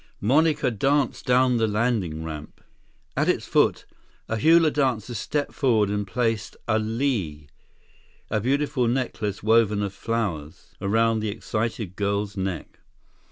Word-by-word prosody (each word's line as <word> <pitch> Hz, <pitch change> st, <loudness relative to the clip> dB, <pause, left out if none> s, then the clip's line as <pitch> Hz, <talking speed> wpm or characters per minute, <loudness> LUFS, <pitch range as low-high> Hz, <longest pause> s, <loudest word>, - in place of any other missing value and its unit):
Monica 150 Hz, +4 st, +2 dB
danced 135 Hz, +6 st, 0 dB
down 125 Hz, 0 st, +4 dB
the 115 Hz, -1 st, +2 dB
landing 105 Hz, -8 st, -1 dB
ramp. 75 Hz, -2 st, -8 dB, 0.6 s
At -, -, +1 dB
its -, -, +1 dB
foot, -, -, +2 dB, 0.4 s
a 110 Hz, -, -2 dB
hula 160 Hz, +5 st, +5 dB
dancer 125 Hz, -5 st, 0 dB
stepped 145 Hz, +6 st, -2 dB
forward 110 Hz, -7 st, +2 dB
and 105 Hz, -1 st, -2 dB
placed 115 Hz, +1 st, -1 dB
a 110 Hz, -1 st, +2 dB
lei, 110 Hz, -, -2 dB, 0.9 s
a 110 Hz, -, +1 dB
beautiful 135 Hz, +1 st, +1 dB
necklace 115 Hz, -5 st, -2 dB
woven 110 Hz, -2 st, +3 dB
of 100 Hz, -1 st, -3 dB
flowers—around 110 Hz, +2 st, -1 dB
the 110 Hz, 0 st, -2 dB
excited 110 Hz, -2 st, -3 dB
girl's 100 Hz, +1 st, -1 dB
neck. 95 Hz, -4 st, -4 dB
110 Hz, 125 wpm, -25 LUFS, 100-125 Hz, 0.9 s, hula